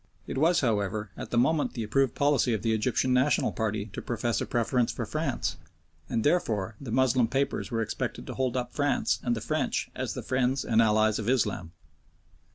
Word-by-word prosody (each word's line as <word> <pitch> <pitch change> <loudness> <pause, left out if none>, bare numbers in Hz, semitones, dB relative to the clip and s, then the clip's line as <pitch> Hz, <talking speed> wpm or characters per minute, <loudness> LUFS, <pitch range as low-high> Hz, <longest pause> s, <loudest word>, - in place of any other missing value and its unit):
It 130 - -3
was, 165 +3 +4
however, 105 -3 -1
at - - -7
the 120 - -1
moment 145 +5 +2
the 115 - -3
approved 130 +4 +1
policy 140 -4 +2
of 105 - -5
the 115 -1 +2
Egyptian 125 +3 +1
National 130 +3 +2
party 110 -2 -2
to - - -5
profess 120 -1 -1
a - - -3
preference 120 0 +1
for - - -4
France, - - -2 0.5
and 115 - 0
therefore 115 - +1
the 135 - -7
Moslem 125 0 +3
papers 135 +3 -1
were 115 -3 0
expected - - -4
to - - -6
hold 130 -1 -1
up 125 -1 -3
France 145 -2 +1
and 120 -1 0
the 115 - -5
French - - -1
as - - -4
the - - -5
friends 130 +1 0
and 115 -1 +4
allies 110 0 +3
of 110 +1 -2
Islam. 105 -9 0
120 Hz, 195 wpm, -28 LUFS, 110-130 Hz, 0.5 s, was